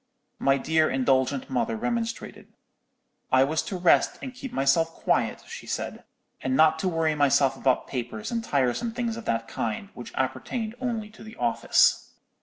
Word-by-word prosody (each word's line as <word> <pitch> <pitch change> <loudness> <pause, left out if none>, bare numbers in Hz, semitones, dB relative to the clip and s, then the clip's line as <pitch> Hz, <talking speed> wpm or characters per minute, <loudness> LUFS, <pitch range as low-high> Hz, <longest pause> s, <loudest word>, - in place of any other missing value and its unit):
"My 135 0 +3
dear 160 +3 +2
indulgent 130 - +1
mother 235 -3 -1
remonstrated: 235 0 -3 0.8
I 130 0 +6
was 155 +3 0
to 190 - -5
rest 175 -1 +3
and 260 - -7
keep 265 0 -8
myself 140 +5 +2
quiet, - - 0
she - - -9
said, - - -4 0.4
and 130 0 0
not 160 +1 +5
to 185 - 0
worry 165 -2 +1
myself 140 -2 +3
about 130 -1 +1
papers 120 -4 -5
and 230 -1 -1
tiresome 140 - 0
things 235 -2 -2
of 230 - -8
that 115 0 -1
kind, 115 - -3
which 120 - -9
appertained 215 - -2
only 225 -4 -3
to 215 - -14
the 220 0 -11
office. 120 -1 +2
160 Hz, 165 wpm, -26 LUFS, -, 0.8 s, I